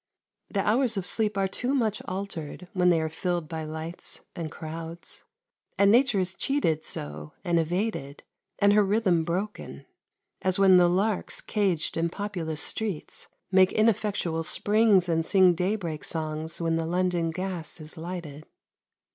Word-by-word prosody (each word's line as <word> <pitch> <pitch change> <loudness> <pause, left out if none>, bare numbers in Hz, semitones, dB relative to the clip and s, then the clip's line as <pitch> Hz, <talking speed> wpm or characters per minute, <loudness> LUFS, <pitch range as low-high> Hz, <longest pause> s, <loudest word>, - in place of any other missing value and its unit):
The 195 -2 -1
hours 230 0 +3
of 190 - -2
sleep 210 -1 +1
are 195 -1 +2
too 250 +8 -1
much 220 -5 0
altered 185 -3 -6
when 180 -1 +3
they 170 -2 +4
are 160 - -1
filled 175 +1 -2
by 160 -1 -5
lights 160 +2 -7
and 165 -2 -4
crowds; 165 +2 -5 0.5
and 200 0 +5
Nature 245 -2 +4
is 185 -1 0
cheated 190 - 0
so, 75 +1 -6
and 170 -1 +2
evaded, 165 -4 -2 0.3
and 200 0 +4
her 210 0 +5
rhythm 195 -5 +2
broken, 185 +6 -4 0.6
as 185 -1 +3
when 190 -2 +6
the 175 -1 +5
larks 195 +3 0
caged 190 -8 -1
in 165 +1 +1
populous 175 -5 -2
streets 210 -8 -2 0.2
make 190 -1 +5
ineffectual 210 -7 +1
springs 205 +2 +4
and 165 -1 +1
sing 185 0 +5
daybreak 180 -3 -2
songs 160 0 -2
when 165 -1 0
the 165 0 -2
London 175 -1 0
gas 180 -1 -5
is 155 +1 -9
lighted. 160 -3 -7
180 Hz, 150 wpm, -27 LUFS, 165-200 Hz, 0.6 s, when